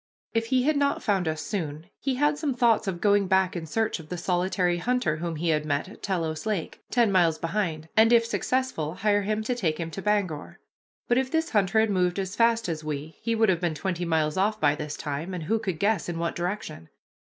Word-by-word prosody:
If 225 Hz, 0 st, 0 dB
he 255 Hz, 0 st, +2 dB
had 300 Hz, +2 st, +2 dB
not 280 Hz, 0 st, +1 dB
found 195 Hz, -5 st, +1 dB
us 155 Hz, 0 st, -2 dB
soon 160 Hz, -6 st, -4 dB
he 270 Hz, -1 st, -1 dB
had 295 Hz, +3 st, +2 dB
some 290 Hz, -3 st, -2 dB
thoughts 230 Hz, -3 st, +3 dB
of 175 Hz, -3 st, -3 dB
going 205 Hz, -1 st, +3 dB
back 190 Hz, 0 st, +2 dB
in 165 Hz, -2 st, -4 dB
search 220 Hz, +4 st, -1 dB
of 155 Hz, -1 st, -12 dB
the 180 Hz, -, -4 dB
solitary 180 Hz, 0 st, +1 dB
hunter 245 Hz, -7 st, 0 dB
whom 165 Hz, 0 st, -3 dB
we 165 Hz, +2 st, -1 dB
had 155 Hz, -1 st, +2 dB
met 145 Hz, +1 st, -1 dB
at 200 Hz, -, -13 dB
Telos 165 Hz, -2 st, -2 dB
Lake, 205 Hz, -7 st, -3 dB
ten 235 Hz, -4 st, +3 dB
miles 170 Hz, -4 st, +3 dB
behind, 165 Hz, -3 st, -2 dB
and, 225 Hz, +1 st, +6 dB
if 230 Hz, -1 st, +5 dB
successful, 235 Hz, -, -1 dB
hire 205 Hz, +1 st, +2 dB
him 215 Hz, +2 st, -1 dB
to 250 Hz, -, -1 dB
take 165 Hz, -10 st, -1 dB
him 165 Hz, -1 st, -4 dB
to 195 Hz, -, -6 dB
Bangor. 195 Hz, -7 st, -1 dB, 0.5 s
But 240 Hz, +1 st, +3 dB
if 260 Hz, 0 st, -1 dB
this 320 Hz, +2 st, 0 dB
hunter 205 Hz, 0 st, +3 dB
had 220 Hz, -1 st, +3 dB
moved 180 Hz, -1 st, +1 dB
as 190 Hz, -1 st, -3 dB
fast 230 Hz, -2 st, +3 dB
as 160 Hz, -2 st, -3 dB
we, 150 Hz, +1 st, -5 dB
he 230 Hz, -1 st, 0 dB
would 220 Hz, -1 st, +3 dB
have 180 Hz, -2 st, +1 dB
been 170 Hz, -3 st, 0 dB
twenty 180 Hz, +2 st, -2 dB
miles 160 Hz, -2 st, 0 dB
off 210 Hz, +3 st, +1 dB
by 145 Hz, -1 st, +4 dB
this 150 Hz, 0 st, -5 dB
time, 155 Hz, +5 st, -4 dB
and 170 Hz, -, -5 dB
who 225 Hz, +8 st, 0 dB
could 190 Hz, -7 st, -3 dB
guess 200 Hz, -1 st, +1 dB
in 170 Hz, -, -3 dB
what 170 Hz, -1 st, -2 dB
direction? 175 Hz, -, -4 dB
190 Hz, 235 wpm, -26 LUFS, 160-220 Hz, 0.5 s, and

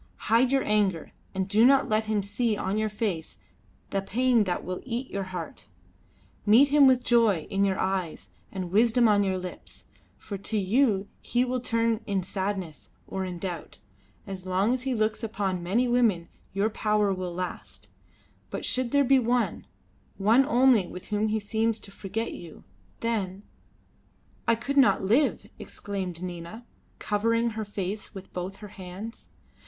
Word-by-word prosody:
Hide 240 Hz, +3 st, +5 dB
your 270 Hz, -1 st, +3 dB
anger, 200 Hz, -6 st, +1 dB, 0.2 s
and 190 Hz, 0 st, -1 dB
do 215 Hz, +3 st, +4 dB
not 270 Hz, +2 st, +5 dB
let 215 Hz, +1 st, +1 dB
him 215 Hz, -2 st, 0 dB
see 215 Hz, +2 st, -1 dB
on 200 Hz, +2 st, -1 dB
your 215 Hz, 0 st, 0 dB
face 200 Hz, -6 st, -3 dB, 0.5 s
the 195 Hz, -, 0 dB
pain 235 Hz, +2 st, +2 dB
that 180 Hz, -2 st, -2 dB
will 185 Hz, 0 st, -4 dB
eat 250 Hz, +1 st, -4 dB
your 195 Hz, -1 st, -3 dB
heart. 180 Hz, -3 st, -7 dB, 0.8 s
Meet 235 Hz, +7 st, +6 dB
him 285 Hz, -1 st, +6 dB
with 255 Hz, -1 st, +4 dB
joy 225 Hz, -10 st, +3 dB
in 195 Hz, 0 st, +2 dB
your 195 Hz, -1 st, +1 dB
eyes 175 Hz, -, -2 dB, 0.2 s
and 185 Hz, -3 st, -5 dB
wisdom 230 Hz, +3 st, +4 dB
on 205 Hz, -1 st, +4 dB
your 190 Hz, -2 st, 0 dB
lips, 180 Hz, -1 st, -9 dB, 0.3 s
for 200 Hz, -2 st, -7 dB
to 215 Hz, +3 st, -2 dB
you 205 Hz, 0 st, +2 dB
he 245 Hz, +2 st, +1 dB
will 255 Hz, 0 st, -1 dB
turn 230 Hz, -2 st, 0 dB
in 195 Hz, -3 st, 0 dB
sadness 190 Hz, -4 st, -4 dB, 0.2 s
or 190 Hz, -, -4 dB
in 180 Hz, -1 st, -5 dB
doubt. 175 Hz, -2 st, -6 dB, 0.5 s
As 190 Hz, -1 st, -7 dB
long 190 Hz, +6 st, +2 dB
as 255 Hz, -, -2 dB
he 260 Hz, -1 st, -1 dB
looks 215 Hz, -1 st, 0 dB
upon 200 Hz, -5 st, -2 dB
many 215 Hz, +9 st, +1 dB
women 230 Hz, -8 st, +2 dB, 0.2 s
your 200 Hz, +3 st, 0 dB
power 210 Hz, -2 st, +1 dB
will 180 Hz, -2 st, -4 dB
last, 180 Hz, 0 st, -6 dB, 0.6 s
but -, -, -4 dB
should 255 Hz, -1 st, +1 dB
there 285 Hz, +2 st, +3 dB
be 270 Hz, 0 st, +5 dB
one, 245 Hz, 0 st, 0 dB, 0.5 s
one 225 Hz, +7 st, +4 dB
only 250 Hz, -8 st, +4 dB
with 180 Hz, +1 st, -10 dB
whom 210 Hz, 0 st, +1 dB
he 215 Hz, 0 st, 0 dB
seems 220 Hz, +2 st, 0 dB
to 200 Hz, -, -14 dB
forget 200 Hz, +3 st, -4 dB
you, 170 Hz, -3 st, -11 dB, 0.4 s
then 200 Hz, -4 st, -2 dB, 0.5 s
" -, -, -36 dB
"I 230 Hz, -, +5 dB
could 275 Hz, +5 st, -4 dB
not 210 Hz, -10 st, +5 dB
live," 235 Hz, +10 st, +2 dB
exclaimed 185 Hz, -4 st, -5 dB
Nina, 175 Hz, +6 st, -7 dB, 0.3 s
covering 230 Hz, +3 st, +1 dB
her 220 Hz, 0 st, -4 dB
face 205 Hz, +1 st, -5 dB
with 190 Hz, -1 st, -10 dB
both 180 Hz, +2 st, -4 dB
her 210 Hz, 0 st, -11 dB
hands. 190 Hz, +5 st, -9 dB
210 Hz, 170 wpm, -27 LUFS, 190-230 Hz, 0.8 s, Meet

